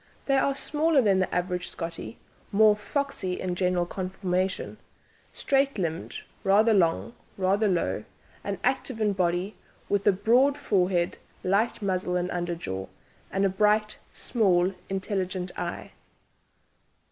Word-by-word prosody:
They 275 -1 +3
are 275 0 +1
smaller 305 +2 +2
than 200 -6 +4
the 185 - 0
average 180 0 -1
Scottie, 165 -10 -6 0.3
more 210 +1 +6
"foxy" 210 -4 -3
in 185 -1 -2
general 180 -1 +1
conformation 185 0 -2 0.5
straight 275 -2 +1
limbed, 170 -3 -3 0.2
rather 210 +3 +5
long, 180 +3 +2 0.2
rather 195 +3 +2
low, 180 -3 0 0.4
and 200 -1 -3
active 260 -2 0
in 210 -2 +2
body, 180 +2 0 0.3
with 200 0 +1
a - - +8
broad 245 +9 +3
forehead, 185 -9 +1 0.2
light 205 +4 +1
muzzle 185 -2 0
and 180 0 -1
underjaw, 170 - -3 0.4
and 195 +1 +1
a - - +3
bright, 210 +2 +2
small 190 -5 +2 0.2
intelligent 190 -2 -2
eye. - - -5
195 Hz, 125 wpm, -27 LUFS, 180-215 Hz, 0.5 s, a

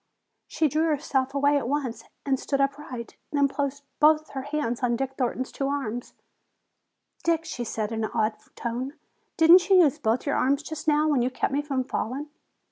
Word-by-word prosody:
She 315 - +1
drew 310 +3 +1
herself 275 -3 0
away 285 +1 +3
at 240 - -4
once 270 -3 -2 0.2
and 270 -2 +1
stood 275 - -1
upright. 275 -4 -3
Then 285 -1 +3
placed 280 0 -3 0.2
both 310 +1 +4
her 270 - -4
hands 285 -4 -2
on 240 -1 +2
Dick 265 +2 -3
Thornton's 255 0 -2
two 275 - -2
arms. 255 -4 -3 1.1
"Dick," 330 -1 +1
she 245 -6 -4
said 220 -1 -3
in 225 -1 -2
an - - -4
awed 220 -1 +1 0.2
tone, 250 +4 -3 0.4
"didn't 345 +4 +7
you 385 - +7
use 290 -5 +2
both 225 +3 0
your 285 - +1
arms 280 +2 +2
just 315 +1 -7
now, 300 0 +4
when 290 -5 +2
you 245 - +1
kept 260 +1 -2
me 285 - +1
from 275 -3 -1
falling?" 270 +4 -4
275 Hz, 190 wpm, -26 LUFS, 250-295 Hz, 1.1 s, didn't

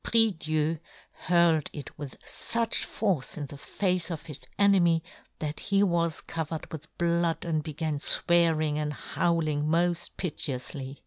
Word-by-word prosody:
prie 225 -1 +4
Dieu 155 -2 -1 0.3
hurled 170 -3 +2
it 145 - -8
with 145 -3 -8
fuch 230 -1 0
force 185 -12 -1
in 145 - -3
the 140 +1 -10
face 180 +4 -1
of 160 -3 -5
his 150 -4 -9
enemy 180 -5 +4 0.3
that 150 -1 -4
he 200 0 +2
was 170 -3 +1
covered 160 -1 -5
with 155 0 -9
blood, 170 -1 +1
and 160 -2 0
began 155 -1 -3
fwearing 160 -2 +4
and 150 -1 -2
howl 165 +1 0
ing 145 -1 0
moft 170 +2 +1
piteoufly. 135 -5 -2
160 Hz, 145 wpm, -28 LUFS, 150-175 Hz, 0.3 s, prie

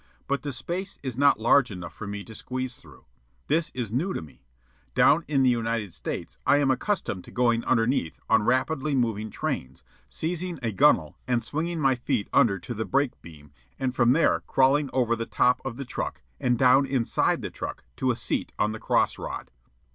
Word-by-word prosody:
But 140 0 -1
the 145 - -4
space 175 +10 -5
is 130 -4 -4
not 140 0 +4
large 125 +3 +4
enough 90 -4 -7
for 105 - -8
me 100 0 -5
to 110 - -11
squeeze 130 +3 -4
through. - - -17 0.4
This 160 +2 +1
is 120 -5 -3
new 160 - 0
to - - -3
me. 70 -5 -16 0.5
Down 165 +3 +5
in 140 -3 +2
the 130 - +5
United 115 -5 -1
States - - -6
I - - +4
am 140 -2 +3
accustomed 130 - -1
to - - -12
going 120 -2 +2
underneath 115 - +1
on 110 - +4
rapidly 135 +5 +1
moving 110 -4 0
trains, 65 -7 -4 0.3
seizing 175 - -3
a 115 - 0
gunnel 95 - +3
and 120 -2 +1
swinging 165 +3 -3
my 135 -3 +3
feet 125 -3 -2
under 100 -4 +4
to 95 +7 -6
the 110 -1 -2
brake 140 +2 0
beam, 75 -3 -14 0.3
and 130 -1 -1
from 120 -1 +4
there 165 +3 +3
crawling 135 +2 +3
over 120 -3 +2
the 115 0 -4
top 125 0 +2
of 120 -3 -5
the 140 - -5
truck 125 - -5 0.2
and 125 -1 +1
down 130 +2 +5
inside 130 -4 +1
the - - -4
truck - - -6
to 130 - 0
a 120 - +2
seat 115 - -3
on 105 - +1
the 110 - -6
cross - - +1
rod. - - -6
125 Hz, 200 wpm, -26 LUFS, 110-140 Hz, 0.5 s, Down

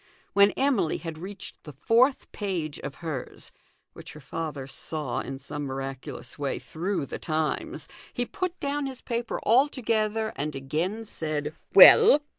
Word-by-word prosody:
When 200 0 +6
Emily 255 - +1
had 165 -2 -7
reached 195 +2 -7
the 150 - -10
fourth 235 - +2
page 175 -8 -3
of 135 - -6
hers, 150 -6 -5 0.4
which - - -11
her 150 - -11
father 150 -1 -5
saw. 145 0 -4
in 135 - -5
some 145 +2 -6
miraculous 135 0 -6
way, 140 -2 -1
through 180 -1 -3
the - - -6
Times, 155 -2 -2 0.2
he 245 - -2
put 365 +6 -4
down 285 0 -1
his 260 -2 -8
paper 235 -1 -3
altogether 225 -4 +2
and 145 +1 -3
again 165 +11 -2
said, 155 -5 -2
" - - -39
"Well 435 -10 +9
165 Hz, 150 wpm, -27 LUFS, 145-230 Hz, 0.4 s, Well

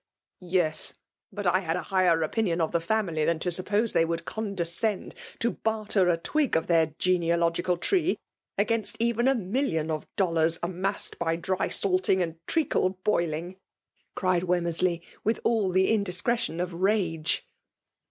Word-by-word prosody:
" - - -66
Yes; 175 -4 0 0.4
but 205 -1 -5
I 180 +1 +3
had 165 -3 -2
then 180 - -2
a - - -13
higher 180 -4 +3
opitiien 180 -3 0
of 160 -2 0
the 170 - +1
family 170 -4 0
than 165 +1 +2
to 180 +3 -2
suppose 205 +6 +1
they - - +4
would 165 0 -2
con 215 -2 -4
descend 185 +4 -1 0.2
to 235 - +1
barter 215 -4 0
a 170 - +3
twig 290 - 0
of 160 - -1
their 160 -3 +2
genealogical 170 0 +1
tree 355 - +1 0.4
against 215 +1 0
even 235 +1 +1
a 270 - +4
million 190 - -1
of 155 -1 -4
dollars, 165 -3 +2
amassed 185 +3 -2
by 165 -1 0
drysalting 185 +1 +1
and 165 -2 -2
treacle 195 - +1
boiling!" 170 -2 -1 0.6
cried 185 -2 +1
Wemmcrsley, 175 -1 0 0.2
with 220 +2 +1
all 225 -4 +2
the 190 +2 +3
indiscretion 200 -3 0
of 180 0 -2
rage. 175 -4 0
180 Hz, 155 wpm, -27 LUFS, 170-210 Hz, 0.6 s, they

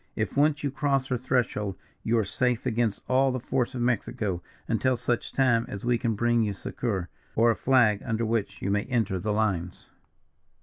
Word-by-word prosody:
If 110 -2 -2
once 150 +1 +3
you 140 - 0
cross 135 -1 0
her 125 - +1
threshold, 115 -6 -1 0.2
you 115 +1 +1
are 110 - +3
safe 125 +3 0
against 115 -4 0
all 130 +1 +3
the 130 - -2
force 130 0 -1
of 120 - -1
Mexico, 115 -6 -1 0.3
until 130 -1 +1
such 120 0 -1
time 125 -4 +3
as 100 +3 -6
we 120 -1 +2
can 115 -2 0
bring 120 +2 +2
you 105 -2 0
succour, 100 -2 -3 0.3
or 115 +1 +5
a - - 0
flag 120 -6 +3
under 115 -1 -1
which 110 -3 -2
you 100 - 0
may 105 0 +1
enter 110 -7 0
the 105 +4 -2
lines." 95 -5 -1
115 Hz, 190 wpm, -27 LUFS, 105-125 Hz, 0.3 s, or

